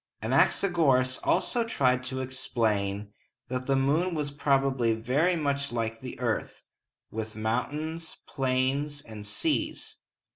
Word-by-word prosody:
Anaxagoras 135 -9 +3
also 240 -2 +2
tried 130 - +2
to 130 +1 -3
explain 105 -6 -1 0.4
that 130 0 -3
the 135 - +3
moon 155 +7 +2
was 150 -2 -2
probably 135 -5 +2
very 140 +11 +2
much 140 -3 -1
like 115 -1 -2
the 125 -2 -7
earth, 120 -3 -2 0.5
with 110 -1 -5
mountains, 150 +9 -2
plains, 135 +2 0
and 105 -2 -9
seas. 105 - -1
130 Hz, 115 wpm, -28 LUFS, 115-145 Hz, 0.5 s, Anaxagoras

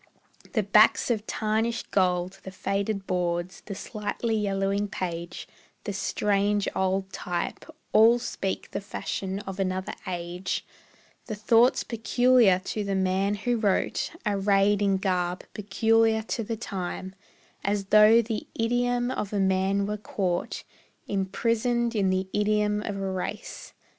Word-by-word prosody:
The 215 -5 +2
backs 210 +4 +5
of 215 -2 -2
tarnished 220 +2 -1
gold, 180 0 +1
the - - -8
faded 195 +1 -2
boards, 180 0 -2
The 200 - -6
slightly 215 +3 -3
yellowing 200 -1 0
page, 175 -3 -5 0.4
the 205 - -4
strange 205 +1 +1
old 190 0 0
type, 175 -1 -3 0.3
All 225 +2 +7
speak 195 -5 -4
the - - -3
fashion 195 0 -4
of 195 -1 -7
another 185 0 -1
age; 175 +1 -3 0.6
The 215 - -3
thoughts 230 +4 +4
peculiar 240 -3 +4
to 210 - -2
the 200 -1 -1
man 190 +2 +1
who 240 +4 0
wrote 205 -4 0
Arrayed 200 0 +2
in 195 -1 +3
garb 180 -2 -1
peculiar 220 +2 +2
to 230 +1 -3
the 225 +1 -4
time; 190 -3 -5 0.5
As 200 0 0
though 215 +2 +7
the 220 -1 -4
idiom 245 +1 +1
of 210 -6 -3
a 205 - -1
man 190 +1 +2
were 210 +1 -2
caught 185 -4 -2 0.4
Imprisoned 230 +5 0
in 195 -3 +2
the 185 0 0
idiom 210 0 +1
of 205 -2 -4
a 195 -1 -2
race. 185 -1 -5
200 Hz, 135 wpm, -27 LUFS, 190-220 Hz, 0.6 s, All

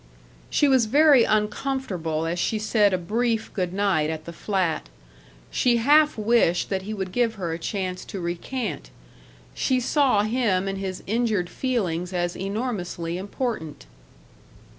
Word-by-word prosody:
She 295 - +3
was 260 -5 +4
very 285 0 +6
uncomfortable 210 - -1
as 170 +2 -2
she 220 - 0
said 210 -1 +2
a 185 - +1
brief 225 +5 -1
good 180 -3 -1
night 190 -6 +1
at 155 -1 -5
the 170 - -7
flat. 180 - -1 0.6
She 245 -2 +2
half 295 +5 +4
wished 215 -6 +2
that 190 -1 0
he 200 +3 -6
would 190 -3 -4
give 230 +2 +1
her 175 -5 -3
a 165 - -5
chance 185 0 -3
to 195 - -6
recant. 175 - -4 0.6
She 255 - +1
saw 255 -4 +2
him 215 -5 +1
and 195 0 -3
his 190 -1 -5
injured 215 -5 0
feelings 185 -9 -2
as 175 -1 -1
enormously 190 -5 -3
important. 195 - -4
200 Hz, 145 wpm, -24 LUFS, 175-235 Hz, 0.6 s, very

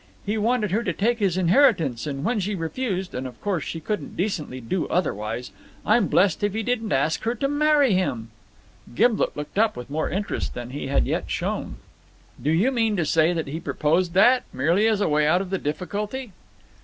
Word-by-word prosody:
He 210 - -1
wanted 220 -2 +1
her 215 +4 +1
to 235 - -2
take 235 +3 0
his 190 -4 +1
inheritance, 180 - +3
and 140 -1 -4
when 230 +3 0
she 200 +1 -2
refused 190 +2 -3
and 130 +1 -4
of 125 - -12
course 195 -6 -1
she 165 - -5
couldn't 210 +6 -4
decently 170 -9 -2
do 140 +9 -2
otherwise 120 - -2 0.3
I'm 215 -2 +3
blessed 185 +1 +2
if 205 0 0
he 220 - -1
didn't 225 -2 -1
ask 140 +4 +1
her 230 +2 -1
to 275 +4 -1
marry 290 -3 +3
him." 120 -12 -1 0.6
Gimblet 230 - +2
looked 150 +7 -4
up 225 0 +2
with 125 +2 -8
more 155 +2 -1
interest 200 +4 -3
than 120 0 -6
he 140 0 -5
had 140 - +2
yet - - -2
shown. - - -3 0.7
"Do 140 - -1
you 185 +12 +3
mean 225 -4 +1
to 170 - +1
say 160 +2 +3
he 150 +3 -5
proposed 170 +3 0
that, 245 +6 +6
merely 170 +11 +2
as 215 -2 +1
a - - +2
way 150 -1 +2
out 175 +4 +4
of 190 -1 -5
the 190 - 0
difficulty?" 205 - -4
185 Hz, 200 wpm, -24 LUFS, 150-220 Hz, 0.7 s, that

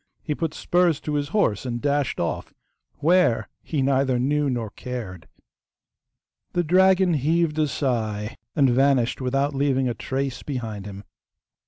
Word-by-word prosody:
He 150 - -1
put 160 0 -3
spurs 175 -4 +2
to 150 - -4
his 145 -1 0
horse 165 - +1
and 120 -2 -3
dashed 145 0 0
off, 85 - -3 0.5
WHERE 155 - +3
he 145 -4 -2
neither 135 -1 +2
knew 145 +3 +1
nor 115 -5 -3
cared. 110 -10 -7 1.3
The 175 - +1
dragon 185 +1 +4
heaved 155 +2 +1
a 155 - +3
sigh 110 -6 -2 0.2
and 140 -3 +4
vanished 135 -1 +2
without 135 +3 0
leaving 135 -1 +1
a 120 - 0
trace 135 +3 -3
behind 110 -7 -5
him. 100 0 -8
135 Hz, 145 wpm, -24 LUFS, 120-150 Hz, 1.3 s, dragon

